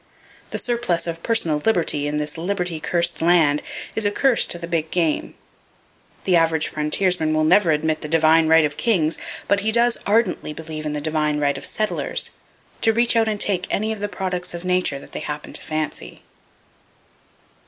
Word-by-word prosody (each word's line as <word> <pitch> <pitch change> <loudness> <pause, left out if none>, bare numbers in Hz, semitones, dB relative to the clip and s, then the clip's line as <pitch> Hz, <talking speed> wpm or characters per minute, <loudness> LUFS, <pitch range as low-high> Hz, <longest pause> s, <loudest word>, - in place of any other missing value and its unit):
The - - -4
surplus 235 -8 -1
of 165 -1 -5
"personal 165 -10 0
liberty" 165 -9 +1
in 150 0 -2
this 150 0 -3
liberty 180 -1 -2
cursed 170 +2 0
land 160 -4 +4 0.3
is 220 - 0
a 205 - +2
curse 250 +3 +2
to - - 0
the 170 - -6
big 165 -2 -2
game. 165 -3 -1 0.9
The 185 - +2
average 160 -2 +2
frontiersman 155 +1 0
never 180 +1 +4
will 155 - +4
admit 155 +1 -1
the - - -4
divine 160 0 +4
right 160 0 +5
of 150 0 -4
kings, 170 -9 +2 0.3
but 200 - +3
he 215 +2 0
does 235 +1 +3
ardently 205 -7 +1
believe 155 -1 -6
in 150 - -3
the 150 - -3
divine 150 -1 0
right 145 -1 +1
of - - -6
settlers,—to 215 +1 -2
reach 235 +1 +3
out 225 -1 +3
and 210 -1 -1
take 180 -3 0
any 215 +2 -1
of 220 - -4
the 205 0 -3
products 180 -3 -3
of 170 +1 -7
Nature 180 -5 +1
that 140 - -12
they - - -5
happen 150 0 -6
to - - -1
fancy. 155 0 -5
170 Hz, 185 wpm, -22 LUFS, 155-200 Hz, 0.9 s, right